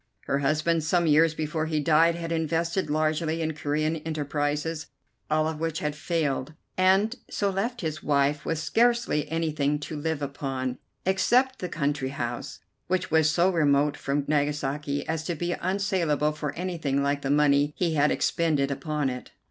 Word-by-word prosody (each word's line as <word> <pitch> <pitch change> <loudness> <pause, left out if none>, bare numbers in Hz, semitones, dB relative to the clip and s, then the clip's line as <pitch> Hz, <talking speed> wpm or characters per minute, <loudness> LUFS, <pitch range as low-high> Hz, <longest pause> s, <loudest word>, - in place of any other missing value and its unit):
Her 140 - -1
husband, 155 +3 +1
some 170 +2 +2
years 160 +1 +4
before 155 0 -2
he 155 -1 0
died, 165 +3 +4
had 170 -1 -5
invested 165 +2 0
largely 155 +1 0
in 160 -1 -1
Corean 155 +1 -1
enterprises, 150 0 -2 0.4
all 155 0 +2
of 160 -1 -4
which 165 -1 -2
had 150 -1 -2
failed, 150 -3 -2 0.2
and 190 +5 +3
so 200 -1 0
left 230 +6 -2
his 155 -2 -3
wife 145 +1 +1
with 165 - -1
scarcely 235 -3 +1
anything 155 -3 0
to 155 - -5
live 150 0 -2
upon 135 -2 -3 0.3
except 250 +8 +2
the 180 - -4
country 145 -3 -1
house, 120 -7 -5 0.3
which 185 -2 -1
was 160 -1 +4
so 175 +4 +3
remote 145 -3 +3
from 140 +1 -1
Nagasaki 145 -1 -1
as 160 -1 -2
to 175 - -2
be 175 +3 -2
unsalable 180 -6 0
for 150 -1 -4
anything 160 -6 -1
like 140 0 0
the 135 - -3
money 145 0 +3
he 170 -3 +1
had 150 -1 +3
expended 150 -5 +1
upon 150 0 -1
it. 125 -1 -5
155 Hz, 165 wpm, -26 LUFS, 145-165 Hz, 0.4 s, years